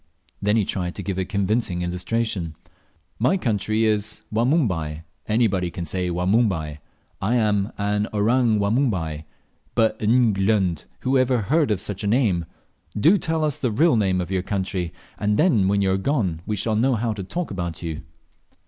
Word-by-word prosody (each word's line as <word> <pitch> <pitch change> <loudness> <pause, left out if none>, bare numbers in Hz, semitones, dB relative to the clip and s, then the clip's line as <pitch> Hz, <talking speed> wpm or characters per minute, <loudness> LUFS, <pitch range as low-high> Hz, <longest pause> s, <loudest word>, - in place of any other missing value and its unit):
Then 105 +1 +2
he 105 - +2
tried 90 -2 -3
to 100 - -6
give 95 +1 -3
a 95 - 0
convincing 100 -2 0
illustration. 90 -1 -2 0.6
"My 125 - +3
country 110 - 0
is 105 0 -1
Wanumbai 105 - +1 0.2
anybody 105 -5 +1
can 85 0 -5
say 90 0 -1
Wanumbai. 90 -4 +1 0.4
I'm 105 -1 +1
an 105 +1 0
orang 115 +2 +2
Wanumbai; 100 - 0 0.5
but, 110 -1 +2
N 115 +1 +4
glung! 95 -4 +1 0.2
who 130 +1 +2
ever 130 -2 +2
heard 150 - +2
of 105 -4 +1
such 100 +1 -5
a - - -1
name? 100 -8 +2 0.5
Do 175 - +5
tell 160 -1 -1
us 150 -1 -1
the 130 - 0
real 150 +7 +3
name 95 -4 +2
of 90 - -5
your 95 -1 +1
country, 95 -3 -2 0.3
and 105 0 +1
then 130 - +3
when 100 0 +2
you 95 - +2
are 95 - +2
gone 95 - -1
we 105 - 0
shall 110 +2 0
know 125 +4 +2
how 115 0 -1
to 105 - -6
talk 170 - -4
about 85 -3 -4
you." 80 -2 -4
105 Hz, 170 wpm, -23 LUFS, 90-115 Hz, 0.6 s, Do